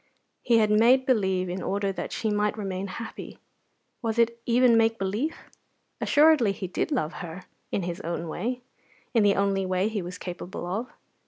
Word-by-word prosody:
He 235 Hz, -2 st, +3 dB
had 215 Hz, -1 st, +3 dB
made 240 Hz, +5 st, +5 dB
believe 190 Hz, -7 st, +1 dB
in 180 Hz, +1 st, -4 dB
order 200 Hz, 0 st, -1 dB
that 195 Hz, -, -5 dB
she 220 Hz, -, -1 dB
might 210 Hz, +1 st, 0 dB
remain 195 Hz, -2 st, -3 dB
happy. 225 Hz, +4 st, -8 dB, 0.6 s
Was 225 Hz, -1 st, -2 dB
it 235 Hz, 0 st, +2 dB
even 240 Hz, 0 st, +5 dB
make 225 Hz, 0 st, +3 dB
belief? 215 Hz, +11 st, -2 dB, 0.6 s
Assuredly 295 Hz, -8 st, +5 dB
he 195 Hz, -, -5 dB
did 185 Hz, -, -2 dB
love 160 Hz, -, 0 dB
her 175 Hz, +1 st, -7 dB, 0.3 s
in 195 Hz, -, -1 dB
his 175 Hz, +2 st, -4 dB
own 170 Hz, -1 st, -4 dB
way, 240 Hz, +10 st, -3 dB, 0.5 s
in 230 Hz, -, +4 dB
the 205 Hz, -1 st, +4 dB
only 195 Hz, -1 st, +1 dB
way 185 Hz, +2 st, 0 dB
he 215 Hz, -3 st, -2 dB
was 180 Hz, +1 st, -7 dB
capable 180 Hz, 0 st, -6 dB
of. 210 Hz, +8 st, -3 dB
205 Hz, 175 wpm, -26 LUFS, 185-230 Hz, 0.6 s, made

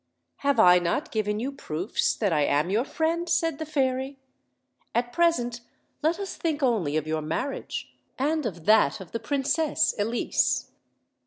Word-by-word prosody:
"Have 280 Hz, 0 st, +1 dB
1 180 Hz, 0 st, +7 dB
not 175 Hz, -, -1 dB
given 210 Hz, -1 st, -1 dB
you 260 Hz, +5 st, -2 dB
proofs 180 Hz, -, -1 dB
that 200 Hz, -6 st, 0 dB
I 150 Hz, -, +2 dB
am 150 Hz, +5 st, +1 dB
your 225 Hz, +6 st, +1 dB
friend?" 335 Hz, +3 st, -1 dB
said 330 Hz, -2 st, +1 dB
the 315 Hz, -, -4 dB
fairy. 265 Hz, -2 st, -1 dB, 0.8 s
"At 240 Hz, +1 st, 0 dB
present 245 Hz, -9 st, +1 dB, 0.4 s
let 320 Hz, +3 st, +1 dB
us 395 Hz, -2 st, -5 dB
think 310 Hz, -3 st, -1 dB
only 195 Hz, -, +1 dB
of 155 Hz, -, -1 dB
your 155 Hz, 0 st, -1 dB
marriage, 165 Hz, -, -4 dB, 0.2 s
and 295 Hz, 0 st, 0 dB
of 170 Hz, -6 st, -8 dB
that 215 Hz, -10 st, +4 dB
of 190 Hz, -3 st, -10 dB
the 230 Hz, -, -3 dB
Princess 290 Hz, +6 st, +1 dB
Elise. 225 Hz, +4 st, 0 dB
245 Hz, 160 wpm, -26 LUFS, 190-300 Hz, 0.8 s, 1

